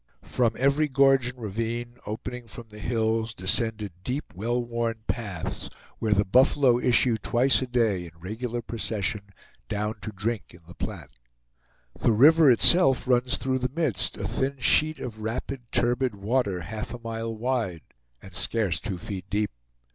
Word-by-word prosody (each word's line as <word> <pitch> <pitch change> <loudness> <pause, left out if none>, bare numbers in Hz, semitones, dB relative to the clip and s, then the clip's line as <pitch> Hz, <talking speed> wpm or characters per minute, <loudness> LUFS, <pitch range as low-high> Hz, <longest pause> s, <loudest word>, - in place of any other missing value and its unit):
From 115 -3 +1
every 140 +3 +2
gorge 135 -2 +4
and 125 0 -6
ravine, 115 +2 -4
opening 120 +3 -6
from 115 0 -6
the 105 0 -11
hills, 110 0 -1
descended 105 +2 0
deep, 130 +7 -4
well 115 +6 -1
worn 115 -2 -3
paths, 100 -9 -4 0.3
where 110 - -1
the 100 0 +3
buffalo 125 +3 +4
issue 120 -2 +3
twice 125 +6 +3
a 130 - -2
day 110 -8 +1
in 85 - -10
regular 115 +6 -4
procession 105 -2 -2 0.5
down 105 +1 -2
to 110 - -5
drink 105 0 -4
in 85 - -17
the 90 - -11
Platte. 75 - -6 0.9
The 115 - +3
river 150 +6 +7
itself 135 +2 +5
runs 125 +1 +2
through 130 -1 -1
the 125 0 -1
midst, 140 - 0
a - - -3
thin 140 +1 -2
sheet 155 +4 +3
of 110 -3 -7
rapid, 120 +2 -5
turbid 120 -1 +1
water, 100 -2 -1
half 110 +6 -5
a - - -9
mile 115 -1 -5
wide, 115 -8 -2 0.4
and 95 - -12
scarce 95 -1 +1
two 100 -5 -4
feet 95 +1 -7
deep. 105 +1 0
115 Hz, 160 wpm, -26 LUFS, 105-125 Hz, 0.9 s, river